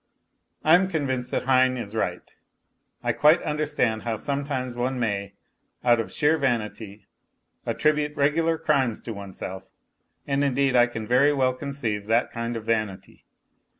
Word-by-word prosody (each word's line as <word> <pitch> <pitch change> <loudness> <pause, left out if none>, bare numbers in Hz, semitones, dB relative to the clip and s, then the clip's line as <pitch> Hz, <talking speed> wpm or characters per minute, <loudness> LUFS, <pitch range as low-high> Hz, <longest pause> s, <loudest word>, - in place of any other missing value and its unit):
I 155 - +5
am 185 +2 +5
convinced 130 -7 -2
that - - -1
Heine 130 0 +3
is 110 -4 -6
right; 110 - -3 0.7
I - - +1
quite 155 +3 +5
understand 150 -7 0
how 115 -2 -2
sometimes 140 0 -2
one 125 +1 -2
may, 100 -4 -2 0.5
out 120 -1 +4
of 115 - -3
sheer 155 +2 +2
vanity, 110 -5 -2 0.6
attribute 150 -1 +1
regular 160 +3 +2
crimes 135 -8 0
to 115 - -5
oneself, 95 -1 -8 0.6
and 140 0 0
indeed 135 -1 +1
I 120 0 +6
can 110 -2 -6
very 130 +5 +4
well 130 -2 +2
conceive 125 -7 -4
that 115 +2 +2
kind 115 0 -4
of 110 - -7
vanity. 110 -4 -3
125 Hz, 150 wpm, -25 LUFS, 115-145 Hz, 0.7 s, I